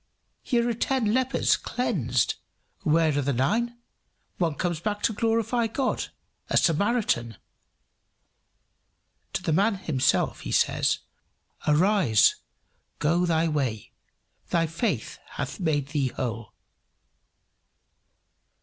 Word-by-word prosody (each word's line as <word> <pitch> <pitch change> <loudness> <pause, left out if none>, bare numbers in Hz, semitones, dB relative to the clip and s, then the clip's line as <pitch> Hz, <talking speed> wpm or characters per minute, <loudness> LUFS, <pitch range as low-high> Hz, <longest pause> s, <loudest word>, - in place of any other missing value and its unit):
here 235 -1 +1
are 240 - +1
ten 235 -2 0
lepers 260 +1 +2
cleansed: 135 - 0 0.5
where 155 -1 +2
are 145 - +1
the 140 +1 0
nine? 225 - 0 0.6
One 165 -4 +1
comes 175 -1 -2
back 205 +3 -3
to 230 - +2
glorify 230 +2 +1
God 255 +4 -1 0.4
a - - +2
Samaritan!" 165 - +1 2.0
To - - -2
the 160 - 0
man 200 +6 +3
himself 155 -9 0
he - - -6
says, - - +2 0.7
"Arise, 155 - +4 0.6
go 170 +4 +1
thy 165 0 +2
way; 130 -9 -2 0.6
thy 165 -1 +2
faith 165 - -2
hath 145 +5 -5
made 145 -6 0
thee 145 -3 0
whole." 115 -3 -5
165 Hz, 105 wpm, -26 LUFS, 145-225 Hz, 2.0 s, Arise